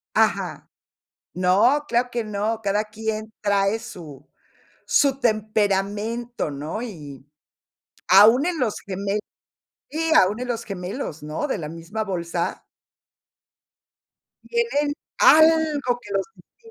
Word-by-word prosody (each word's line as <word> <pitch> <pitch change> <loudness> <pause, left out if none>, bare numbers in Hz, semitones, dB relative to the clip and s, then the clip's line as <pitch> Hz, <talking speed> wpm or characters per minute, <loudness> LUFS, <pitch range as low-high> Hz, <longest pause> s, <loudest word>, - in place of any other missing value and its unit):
Ajá. - - 0 0.6
No, 200 - +3
claro 240 +1 +1
que 235 -1 -2
no, 215 +2 -2
cada 205 +1 0
quien 220 0 -5
trae 200 +1 +1
su 155 - -11 0.6
su 275 -2 +3
temperamento, 215 - -1
¿no? 150 +9 -5
Y, 145 - -9 0.8
aún 220 - +7
en 350 -2 -1
los 240 -6 0
gemel 200 +2 -2 0.7
sí, 325 +1 -1
aún 205 +5 +1
en 250 - -4
los 235 -2 -3
gemelos, 180 - -6
¿no?, 150 - -3
de 265 - -2
la 155 -4 -5
misma 170 +7 -5
bolsa 170 -3 -3 1.8
tienen 380 -12 0 0.3
algo 310 -5 +5
que 205 -4 -10
los 195 -1 0
distingue. - - -23
215 Hz, 115 wpm, -23 LUFS, 190-245 Hz, 1.8 s, aún